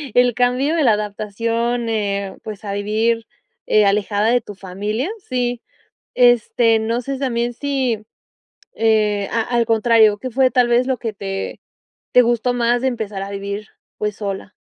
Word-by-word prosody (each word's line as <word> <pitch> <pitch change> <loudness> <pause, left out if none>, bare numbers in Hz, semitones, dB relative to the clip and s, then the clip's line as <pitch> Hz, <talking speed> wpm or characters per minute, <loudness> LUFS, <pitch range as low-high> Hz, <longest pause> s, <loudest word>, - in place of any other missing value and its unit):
el 245 0 +4
cambio 250 +5 +1
de 325 - +2
la 235 -5 +5
adaptación, 230 +3 -2
eh, 200 -3 -2
pues, 215 -1 -8
a 200 - -3
vivir 220 +3 0 0.4
eh, 210 -1 +4
alejada 205 +1 +1
de 245 +1 +3
tu 205 - -10
familia, 210 - -3
sí. 245 - -2 0.5
Este, 240 -2 +4
no 230 +2 -1
sé, 275 +3 -3
sí - - -5
también 240 -2 -1
si, 260 -5 -1 0.7
eh, 210 -3 +1
a 230 - +1
al 235 0 0
contrario, 220 -2 +4
¿qué 255 +4 -5
fue 260 +2 +3
tal 250 0 +3
vez 240 +1 +3
lo 260 - +1
que 225 -2 -4
te 195 -1 -5 0.5
te 250 - +7
gustó 240 +1 +1
más 240 0 +1
de 265 - +2
empezar 215 -5 -4
a 195 - -6
vivir, 200 +1 -5 0.3
pues, 210 -1 -2
sola? 200 -1 -5
225 Hz, 170 wpm, -20 LUFS, 210-245 Hz, 0.7 s, te